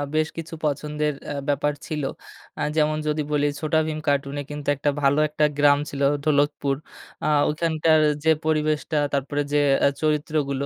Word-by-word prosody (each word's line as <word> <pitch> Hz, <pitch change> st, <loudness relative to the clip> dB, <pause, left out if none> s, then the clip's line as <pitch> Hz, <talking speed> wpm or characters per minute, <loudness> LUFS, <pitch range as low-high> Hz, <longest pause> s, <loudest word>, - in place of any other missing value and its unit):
বেশ 155 Hz, 0 st, +2 dB
কিছু 165 Hz, 0 st, -6 dB
পছন্দের 150 Hz, +1 st, -1 dB, 0.2 s
আ -, -, -5 dB
ব্যাপার 145 Hz, +1 st, +1 dB
ছিল। 150 Hz, -2 st, -3 dB, 0.6 s
আ -, -, -2 dB
যেমন 155 Hz, -1 st, +2 dB
যদি 150 Hz, 0 st, 0 dB
বলি 145 Hz, 0 st, +2 dB
ছোটাভীম 155 Hz, 0 st, 0 dB
কার্টুনে 140 Hz, 0 st, 0 dB
কিন্তু 145 Hz, -1 st, -7 dB
একটা 145 Hz, +1 st, 0 dB
ভালো 140 Hz, +1 st, +3 dB
একটা 150 Hz, 0 st, +1 dB
গ্রাম 145 Hz, -1 st, +5 dB
ছিল 140 Hz, -, -5 dB, 0.2 s
ঢোলকপুর। 145 Hz, -2 st, +1 dB, 0.5 s
আ -, -, +1 dB, 0.2 s
ওইখানকার 160 Hz, 0 st, +2 dB, 0.2 s
যে, 160 Hz, -, +5 dB
পরিবেশটা 155 Hz, 0 st, 0 dB, 0.2 s
তারপরে 140 Hz, +1 st, -1 dB
যে, 150 Hz, -, +4 dB, 0.3 s
আ -, -, +7 dB
চরিত্রগুলো 150 Hz, -2 st, 0 dB
150 Hz, 150 wpm, -24 LUFS, 145-155 Hz, 0.6 s, আ